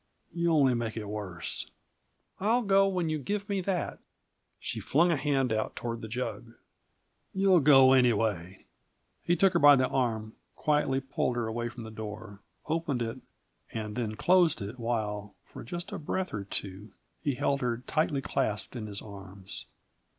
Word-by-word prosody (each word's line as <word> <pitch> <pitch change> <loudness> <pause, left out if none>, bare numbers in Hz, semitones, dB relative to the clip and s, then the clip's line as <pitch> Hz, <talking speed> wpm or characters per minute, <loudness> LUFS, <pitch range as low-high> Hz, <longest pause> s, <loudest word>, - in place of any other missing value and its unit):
You 170 0 +1
only 140 -5 +4
make 115 -2 -2
it 110 - -4
worse." 95 -6 -4 0.7
"I'll 230 +5 +2
go 195 -1 +4
when 180 -4 0
you 155 -1 -1
give 200 +8 -3
me 200 -2 0
that." 185 -1 -2 0.6
She - - -4
flung 170 +5 +3
a - - +3
hand 135 -4 +1
out 110 0 -2
toward 115 -1 -4
the 110 - -6
jug. 120 0 -4 0.8
"You'll 190 -2 +5
go 135 -3 +7
anyway!" 105 -8 +1 0.6
He 175 - +2
took 195 +1 +4
her - - +3
by 145 0 +9
the 130 -1 +2
arm, 110 -4 -1 0.2
quietly 150 -3 +1
pulled 135 -2 -1
her 120 -1 -1
away 120 +1 -2
from 115 0 -9
the 110 - -8
door, 110 -1 -7 0.3
opened 155 -6 -1
it, 115 +3 -4 0.5
and 105 -2 -4
then 115 -3 -2
closed 175 +3 +4
it 105 +5 -6
while, 105 -3 -2
for - - -10
just 175 +8 -6
a - - -4
breath 185 +5 -2
or 100 -2 -3
two, 100 +1 -5 0.3
he 140 -3 0
held 140 +3 0
her 120 -1 -1
tightly 150 -3 0
clasped 110 -4 -2
in 110 -3 -4
his 100 -1 -6
arms. 100 -2 -9
125 Hz, 170 wpm, -29 LUFS, 110-155 Hz, 0.8 s, by